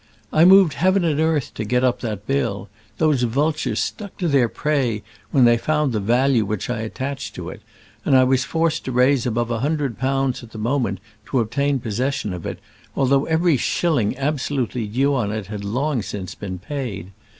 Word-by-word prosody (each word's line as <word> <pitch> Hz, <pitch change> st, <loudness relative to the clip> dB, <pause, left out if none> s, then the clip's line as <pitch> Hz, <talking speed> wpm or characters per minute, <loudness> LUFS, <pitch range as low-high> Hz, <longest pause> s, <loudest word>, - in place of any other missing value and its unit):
"I 160 Hz, +2 st, +6 dB
moved 190 Hz, -4 st, +7 dB
heaven 185 Hz, +4 st, +2 dB
and 155 Hz, -3 st, +1 dB
earth 160 Hz, -4 st, 0 dB
to 110 Hz, -, -4 dB
get 125 Hz, +4 st, +1 dB
up 125 Hz, -1 st, +2 dB
that 105 Hz, -4 st, -4 dB
bill. 105 Hz, -7 st, -1 dB, 0.3 s
Those 155 Hz, -5 st, +2 dB
vultures 140 Hz, +6 st, 0 dB
stuck 205 Hz, -3 st, -4 dB
to 180 Hz, -, -1 dB
their 135 Hz, -6 st, +3 dB
prey 130 Hz, -9 st, -1 dB, 0.3 s
when 135 Hz, -4 st, +4 dB
they 120 Hz, 0 st, +5 dB
found 150 Hz, -1 st, 0 dB
the 110 Hz, -, 0 dB
value 120 Hz, +3 st, +2 dB
which 105 Hz, +3 st, -3 dB
I 120 Hz, -, -2 dB
attached 130 Hz, +5 st, -5 dB
to -, -, -6 dB
it, -, -, -11 dB, 0.4 s
and 135 Hz, -, +4 dB
I 130 Hz, -, +6 dB
was 130 Hz, 0 st, +2 dB
forced 165 Hz, -1 st, 0 dB
to 130 Hz, -, -3 dB
raise 125 Hz, +1 st, +3 dB
above 120 Hz, 0 st, -1 dB
a 115 Hz, -, -1 dB
hundred 140 Hz, -3 st, -1 dB
pounds 135 Hz, 0 st, 0 dB
at 120 Hz, -2 st, -13 dB
the -, -, -8 dB
moment 115 Hz, -4 st, -1 dB, 0.3 s
to 130 Hz, -, +1 dB
obtain 140 Hz, +5 st, 0 dB
possession 115 Hz, -1 st, -2 dB
of 90 Hz, -2 st, -6 dB
it, -, -, -5 dB, 0.4 s
although 135 Hz, +1 st, +2 dB
every 160 Hz, -1 st, +3 dB
shilling 130 Hz, -4 st, 0 dB
absolutely 135 Hz, -5 st, -1 dB
due 135 Hz, +7 st, +1 dB
on 115 Hz, -7 st, 0 dB
it 110 Hz, -2 st, -4 dB
had 105 Hz, -1 st, -5 dB
long 125 Hz, +5 st, -1 dB
since 95 Hz, -2 st, -6 dB
been 95 Hz, -3 st, -6 dB
paid. 100 Hz, -, -5 dB
130 Hz, 195 wpm, -21 LUFS, 110-145 Hz, 0.4 s, moved